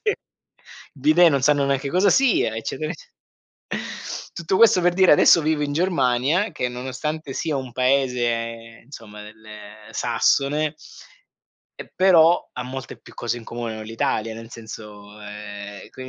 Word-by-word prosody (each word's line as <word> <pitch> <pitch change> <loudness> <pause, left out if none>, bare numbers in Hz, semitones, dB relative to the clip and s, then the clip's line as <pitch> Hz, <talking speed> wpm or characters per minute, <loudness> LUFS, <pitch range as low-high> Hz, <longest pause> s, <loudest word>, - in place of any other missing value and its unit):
il 425 -2 0 0.8
bidet 155 +5 +5
non 140 -3 +1
sanno 145 0 +3
neanche 140 0 -1
cosa 185 +6 +3
sia, 250 - +3
eccetera 155 +7 -4
ecce 160 - -13 1.2
tutto 170 +3 -1
questo 215 -5 +6
per 175 0 +3
dire 185 -2 +6
adesso 165 +3 +6
vivo 155 -1 0
in 145 - -2
Germania, 160 - +1
che 125 -5 -2
nonostante 130 +4 -5
sia 155 -3 -2
un 130 -2 -4
paese 120 -3 -1
insomma 105 -6 -11
del 110 +1 -15 0.5
sassone. 145 +6 +1 1.0
E - - -10
però 175 -2 +4
ha 125 - -5
molte 130 0 -7
più - - -16
cose 120 0 -3
in 120 - -9
comune 115 -1 -5
con 110 0 -7
l'Italia, 115 0 -2
nel 115 0 -9
senso, 105 -2 -11
ehm, 105 -1 -9
qui 130 0 -9
130 Hz, 145 wpm, -22 LUFS, 115-155 Hz, 1.2 s, questo